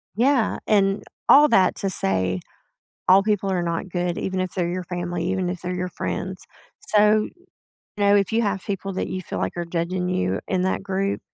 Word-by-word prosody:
Yeah, 250 +1 +2
and 195 -1 +2 0.2
all 295 +2 +8
that 185 -7 +4
to 195 - -2
say 95 - 0 0.7
all 190 +2 +7
people 205 -2 0
are 180 -2 0
not 170 +2 -2
good, 175 -1 -2
even 190 -1 -2
if 185 -1 -3
they're 175 -3 0
your 180 +1 -3
family, 175 -1 -3
even 190 -2 -1
if 180 -1 -5
they're 180 0 -3
your 180 0 -2
friends, - - -4 0.4
so, 210 0 +3 0.7
you 205 - 0
know, 200 0 +5
if 200 -2 +3
you 230 +1 +2
have 200 -3 -1
people 195 0 -3
that - - -2
you 185 0 -4
feel - - -5
like - - -2
are 175 - -2
judging 175 +2 -2
you 95 - 0
in 185 - 0
that 190 +1 -1
group, 195 +1 -1
185 Hz, 200 wpm, -23 LUFS, 175-200 Hz, 0.7 s, all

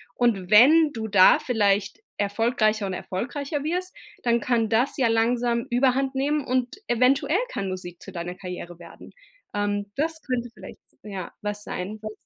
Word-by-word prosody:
Und 210 -7 +1
wenn 295 +8 +7
du 220 -1 -4
da 200 -3 +6
vielleicht 205 -4 0 0.2
erfolgreicher 215 +1 +1
und 190 - -3
erfolgreicher 275 - -4
wirst, 360 +4 -3 0.3
dann 235 -1 +2
kann 235 -3 +1
das 235 +5 +1
ja 260 -4 +3
langsam 235 +1 +1
überhandnehmen. 270 +3 +1
Und 255 -1 -1
eventuell 255 +7 +2
kann 195 - -3
Musik 180 -2 -7
zu 195 - -10
deiner 175 0 -5
Karriere 180 -2 -8
werden. 170 -1 -13 0.4
Ähm, 205 0 -2
das 315 +2 -2
könnte 245 -2 -3
vielleicht, - - -11 0.3
ja, 195 -4 -6
was 210 0 -4
sein, 195 +3 -5
was 215 - -4
230 Hz, 150 wpm, -25 LUFS, 200-255 Hz, 0.4 s, wenn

